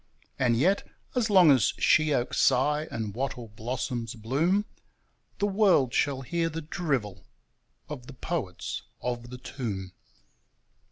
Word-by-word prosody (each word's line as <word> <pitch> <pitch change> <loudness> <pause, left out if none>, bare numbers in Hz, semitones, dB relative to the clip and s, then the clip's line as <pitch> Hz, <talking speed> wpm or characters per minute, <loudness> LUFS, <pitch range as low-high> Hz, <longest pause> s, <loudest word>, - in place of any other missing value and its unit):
And 120 -3 +3
yet, 185 +10 +3 0.3
as 240 -3 +1
long 185 -6 +7
as 130 -6 +4
sheoaks 150 -6 +2
sigh 150 +4 +3
and 110 -3 -4
wattle 125 -1 -4
blossoms 120 +2 -4
bloom, 155 - +1 0.7
The 205 - +1
world 190 - +3
shall 140 -2 +1
hear 165 +5 -1
the 165 0 -5
drivel 135 - -2 0.6
of 130 -5 -8
the 140 - -9
poets 125 - -4 0.2
of 120 -1 -4
the 125 - -7
tomb. 110 -8 -5
130 Hz, 125 wpm, -28 LUFS, 120-165 Hz, 0.7 s, long